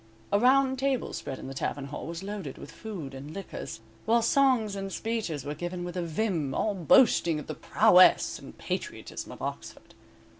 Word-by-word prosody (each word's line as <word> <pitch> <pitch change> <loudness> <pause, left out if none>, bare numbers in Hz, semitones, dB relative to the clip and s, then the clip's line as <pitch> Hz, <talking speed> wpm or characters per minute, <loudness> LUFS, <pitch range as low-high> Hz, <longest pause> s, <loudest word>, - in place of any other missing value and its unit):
A 200 - +5
round 265 +2 +4
table 270 -1 0
spread 135 - -5
in - - -9
the 135 - -6
tavern 135 +1 -3
hall 140 - -6
was 170 +2 -6
loaded 195 -9 -5
with - - -10
food 180 -11 -7
and 140 +5 -8
liquors, 195 -11 -7 0.2
while 230 +1 +3
songs 245 -5 +3
and 195 0 -4
speeches 210 - -3
were 145 - -3
given 175 +3 -4
with 175 0 -6
a 180 - -1
vim, 165 -4 -1
all 215 - +1
boasting 170 - +4
of 150 - -8
the - - -5
prowess - - +5
and - - -12
patriotism - - -5
of - - -9
Oxford. - - -7
190 Hz, 185 wpm, -28 LUFS, 150-225 Hz, 0.2 s, A